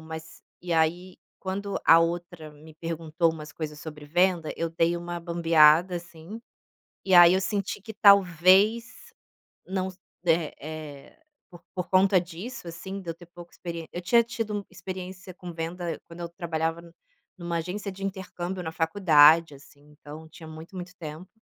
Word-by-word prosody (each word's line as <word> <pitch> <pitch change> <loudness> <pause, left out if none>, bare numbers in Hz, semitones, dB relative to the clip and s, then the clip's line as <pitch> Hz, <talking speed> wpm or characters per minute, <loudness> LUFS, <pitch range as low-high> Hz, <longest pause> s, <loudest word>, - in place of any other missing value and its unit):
mas 160 0 -10 0.2
e 175 -1 -4
aí 175 +3 0 0.2
quando 195 +1 -4
a 165 - +8
outra 170 -1 -3
me 150 +1 -16
perguntou 165 0 -1
umas 155 -1 -9
coisas 150 -1 -6
sobre 150 -2 -9
venda, 175 +1 +1
eu 165 - -1
dei 165 +1 +1
uma 175 0 -5
bambeada, 170 0 +4
assim, 170 +4 -10 0.7
e 190 -2 +3
aí 175 0 +9
eu 190 - +2
senti 200 0 -2
que 220 +1 -9
talvez 200 - +4 0.6
não 190 0 -2
s 185 -1 -12 0.3
eh 165 -2 +2
eh, 155 - -9 0.3
por 175 -2 -14
por 180 -2 -4
conta 190 0 +5
disso, 180 +6 -7
assim, 190 +3 -7
de 170 - -5
eu - - -5
ter 175 +1 -15
pouca 175 0 -14
experiên 170 -2 -7
eu 175 - -4
tinha 230 +6 +4
tido 215 -3 -4
experiência 185 -1 -8
com 180 -2 -9
venda 165 +1 -4
quando 170 +1 -12
eu 170 - -4
trabalhava 165 -2 -3
n 170 0 -15 0.5
em - - -12
uma 170 0 -2
agência 195 +4 -5
de 195 +1 -12
intercâmbio 190 -1 -5
na 160 - -5
faculdade, 160 -2 +5
assim, 140 +1 -18 0.2
então 155 +2 -10
tinha 160 0 -12
muito, 160 +4 -11
muito 180 0 -8
tempo. 160 +2 -8
170 Hz, 170 wpm, -26 LUFS, 160-185 Hz, 0.7 s, aí